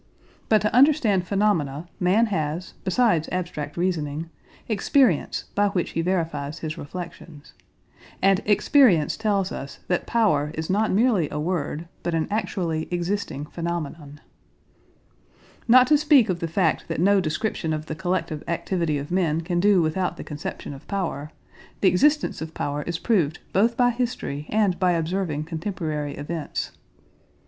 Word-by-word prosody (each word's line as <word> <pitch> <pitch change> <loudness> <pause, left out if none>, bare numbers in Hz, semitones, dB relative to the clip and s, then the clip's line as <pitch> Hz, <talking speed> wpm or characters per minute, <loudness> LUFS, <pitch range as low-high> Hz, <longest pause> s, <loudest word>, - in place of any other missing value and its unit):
But 215 -1 +4
to 210 - 0
understand 245 - +4
phenomena 175 -7 0
man 195 +5 +3
has, 155 +2 -2
besides 185 -4 +2
abstract 175 -5 -4
reasoning, 165 -3 -2 0.4
experience 220 - +2
by 205 0 +3
which 185 -3 -1
he 165 - -1
verifies 165 -4 -2
his 155 -2 -4
reflections. 165 -1 -9 0.7
And 195 0 +3
experience 205 - +4
tells 200 -4 0
us 140 - -7
that 180 - 0
power 175 -11 +2
is 160 +2 -3
not 215 +3 +2
merely 205 - +2
a 150 - -4
word 165 -1 -2
but 175 - -1
an 160 - 0
actually 175 -7 -1
existing 175 -4 -2
phenomenon. 160 -3 -5 1.5
Not 250 +2 +7
to 295 +2 +4
speak 285 -7 +5
of 175 -2 -1
the 165 - -2
fact 165 0 0
that - - -3
no 195 +3 +4
description 160 +1 -2
of 155 0 -3
the 155 - -5
collective 165 -2 -2
activity 170 -2 -1
of 140 +3 -6
men 165 -4 +1
can 175 +1 -1
do 195 -2 +4
without 175 +2 -1
the - - -6
conception 150 -1 -6
of 135 - -12
power, 170 -7 -3 0.5
the 190 - +6
existence 290 - +2
of 160 0 -6
power 145 +1 -2
is 170 -1 -1
proved 175 - +1 0.2
both 230 +5 +3
by 245 -1 +4
history 230 - -3
and 205 -5 +1
by 180 -1 +3
observing 165 -2 -1
contemporary 155 -3 -4
events. 155 +2 -4
175 Hz, 150 wpm, -24 LUFS, 155-200 Hz, 1.5 s, Not